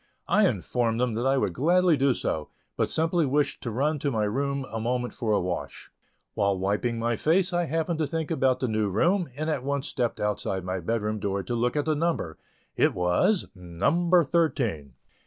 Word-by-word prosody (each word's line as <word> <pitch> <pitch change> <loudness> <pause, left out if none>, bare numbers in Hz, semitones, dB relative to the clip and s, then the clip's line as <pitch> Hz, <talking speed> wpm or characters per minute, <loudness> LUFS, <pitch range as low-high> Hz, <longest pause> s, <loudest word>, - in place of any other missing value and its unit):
I - - +4
informed 115 -2 -1
them 125 -2 +1
that 120 +4 -1
I 135 +1 +3
would 100 -8 0
gladly 175 - +3
do 135 -2 +2
so, 75 -1 -3 0.3
but - - 0
simply 165 +1 +1
wished 145 +2 0
to 120 - -4
run 145 +7 0
to 140 - -1
my 110 -5 0
room 140 +5 -1
a 115 - -3
moment 125 +2 -2
for 110 -2 -2
a 105 - +3
wash. 90 -1 -5 0.4
While 100 -1 +1
wiping 105 +5 -1
my 115 +1 0
face 175 - +2
I 175 0 +1
happened 165 +2 -1
to 155 - +1
think 160 +1 -3
about 130 -5 +1
the 130 - +1
new 110 -2 0
room, 170 - +1
and 155 +2 -3
at 150 -5 -1
once 140 +1 -2
stepped 120 -4 -2
outside 105 -2 -1
of 95 - -5
my 95 0 -2
bed 110 +5 -2
room 105 0 -2
door 100 -1 -2
to 120 - -4
look 120 +3 0
at 145 - 0
the 155 - +2
number. 150 - -2 0.4
It - - +2
was 90 - +1
"number 160 - +2
thirteen." 125 - 0
125 Hz, 210 wpm, -26 LUFS, 105-155 Hz, 0.4 s, I